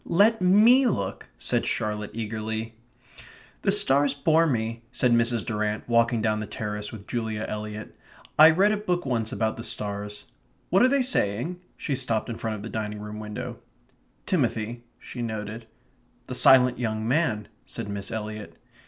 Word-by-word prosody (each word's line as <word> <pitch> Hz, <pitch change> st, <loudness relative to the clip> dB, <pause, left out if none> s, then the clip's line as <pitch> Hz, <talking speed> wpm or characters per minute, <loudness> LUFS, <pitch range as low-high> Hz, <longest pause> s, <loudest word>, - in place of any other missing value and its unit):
"Let 205 Hz, +4 st, +3 dB
ME 220 Hz, +8 st, +6 dB
look," 100 Hz, -, -3 dB
said -, -, 0 dB
Charlotte 105 Hz, -1 st, -2 dB
eagerly. 110 Hz, 0 st, -4 dB, 0.9 s
"The -, -, +2 dB
stars 140 Hz, +1 st, +5 dB
bore 160 Hz, +3 st, +3 dB
me," 115 Hz, -4 st, -2 dB
said 125 Hz, 0 st, +1 dB
Mrs. 115 Hz, -1 st, +2 dB
Durrant, 105 Hz, -1 st, -2 dB
walking 115 Hz, -1 st, +2 dB
down 110 Hz, -1 st, +1 dB
the 110 Hz, -, -5 dB
terrace 105 Hz, 0 st, -5 dB
with 105 Hz, -3 st, -10 dB
Julia 110 Hz, -2 st, -3 dB
Eliot. 105 Hz, 0 st, -6 dB, 0.4 s
"I 155 Hz, +1 st, +10 dB
read 190 Hz, +6 st, +4 dB
a 215 Hz, -, +1 dB
book 180 Hz, -4 st, -2 dB
once 115 Hz, -4 st, -1 dB
about 110 Hz, -1 st, -1 dB
the 115 Hz, -, -6 dB
stars.... 105 Hz, -1 st, -4 dB, 0.5 s
What 190 Hz, -, +4 dB
are 250 Hz, -, +7 dB
they 275 Hz, -1 st, +2 dB
saying?" 150 Hz, -, -1 dB, 0.2 s
She 145 Hz, -, -3 dB
stopped 120 Hz, -4 st, 0 dB
in 115 Hz, -, -6 dB
front 110 Hz, -1 st, -3 dB
of 105 Hz, -, -8 dB
the -, -, -5 dB
dining 105 Hz, -1 st, -4 dB
room 105 Hz, 0 st, -7 dB
window. 105 Hz, -1 st, -6 dB, 0.7 s
"Timothy," 120 Hz, -, -1 dB
she 125 Hz, -, -8 dB
noted. 110 Hz, 0 st, -5 dB, 0.6 s
"The -, -, -6 dB
silent 125 Hz, -1 st, +6 dB
young 110 Hz, -2 st, -2 dB
man," 120 Hz, -7 st, 0 dB, 0.2 s
said -, -, -5 dB
Miss 100 Hz, -1 st, -5 dB
Eliot. 110 Hz, -2 st, -6 dB
115 Hz, 160 wpm, -26 LUFS, 105-140 Hz, 0.9 s, I